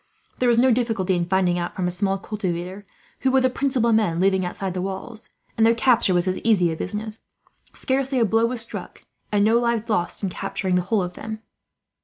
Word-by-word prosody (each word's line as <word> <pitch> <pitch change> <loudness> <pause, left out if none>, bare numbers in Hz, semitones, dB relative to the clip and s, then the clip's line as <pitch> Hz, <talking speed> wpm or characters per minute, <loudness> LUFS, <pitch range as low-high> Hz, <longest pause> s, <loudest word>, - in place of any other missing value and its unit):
There 250 - +3
was 235 - +3
no 255 +2 +5
difficulty 225 -6 +1
in 175 -1 -1
finding 180 -1 +1
out, 175 - -4
from 185 - -2
a - - -1
small 195 +2 +1
cultivator, 190 -1 -5 0.3
who 265 - +1
were 265 0 +4
the 255 0 +2
principal 250 -4 +1
men 210 -7 +2
living 190 0 +2
outside 185 +1 -4
the 180 - -3
walls; 195 +4 -6 0.3
and 225 - +2
their 230 +1 +5
capture 230 -6 +3
was 175 +1 +1
as 185 - -1
easy 190 -7 +2
a - - -3
business. 215 +5 -5 0.5
Scarcely 265 0 -1
a 235 - +4
blow 225 +2 +2
was 240 -1 0
struck, 230 - -7 0.3
and 205 -1 +3
no 225 +2 +4
lives 235 -1 -1
lost, 205 -2 -1
in 195 - 0
capturing 185 +1 -3
the 180 - +3
whole 195 +2 0
of 180 0 -5
them." 220 +2 -7
210 Hz, 215 wpm, -23 LUFS, 185-230 Hz, 0.5 s, no